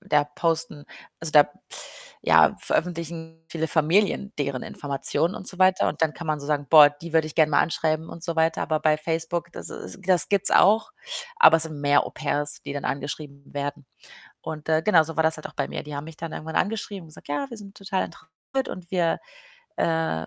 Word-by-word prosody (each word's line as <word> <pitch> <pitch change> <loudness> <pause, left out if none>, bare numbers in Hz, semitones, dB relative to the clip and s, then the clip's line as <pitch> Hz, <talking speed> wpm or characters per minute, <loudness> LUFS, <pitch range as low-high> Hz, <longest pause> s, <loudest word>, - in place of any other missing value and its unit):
da 150 -7 +2
posten, 160 0 -2 0.4
also, 160 -1 -2
da 150 -1 +6 0.7
ja, - - +5
veröffentlichen 165 -1 -3
viele 160 -1 -3
Familien 190 +6 +2
deren 140 -3 -2
Informationen 145 +5 -1
und 190 - -8
so 185 - -4
weiter 185 0 +4
und - - -4
dann 160 -1 +2
kann 170 - -8
man 155 -1 -1
so 140 - -8
sagen: 145 -1 -1
„Boah, 150 -1 +9
die 155 +3 -11
würde 160 -1 +3
ich 155 - -8
gern 155 -2 +4
mal - - +4
anschreiben“, 160 0 0
und 165 - -9
so 170 -2 -3
weiter. 160 0 +2
Aber 155 -2 -1
bei 155 0 +3
Facebook, 165 +2 -3
das - - -8
is - - -8
das 185 -3 +3
gibt's 200 -1 +3
auch, 220 - +5 0.5
aber 465 - +8
es 160 - +1
sind 155 -3 -7
mehr 145 0 +3
Au-pairs, 145 -1 -1
die - - -6
dann 145 -1 -5
angeschrieben 140 0 -4
werden. 145 0 -4 0.6
Und, 155 -1 -7
äh, 160 0 +3
genau 170 -4 +5
so 165 0 -7
war 160 - +3
das 160 0 +2
halt 155 - -7
auch - - -16
bei - - -2
mir. - - -5
Die 150 0 -8
haben 145 - -5
mich 160 0 -11
dann 165 -1 -6
irgendwann 160 +1 -6
angeschrieben 200 -2 -2
und - - -15
gesagt: 155 - -13
„Ja, 145 - -2
wir 235 - -8
sind 200 -1 -12
total 195 -1 -2
interessiert 160 +12 -6
und 175 -2 -8
wir, 175 -3 +1 0.6
äh, 160 - 0
160 Hz, 215 wpm, -25 LUFS, 150-170 Hz, 0.7 s, Boah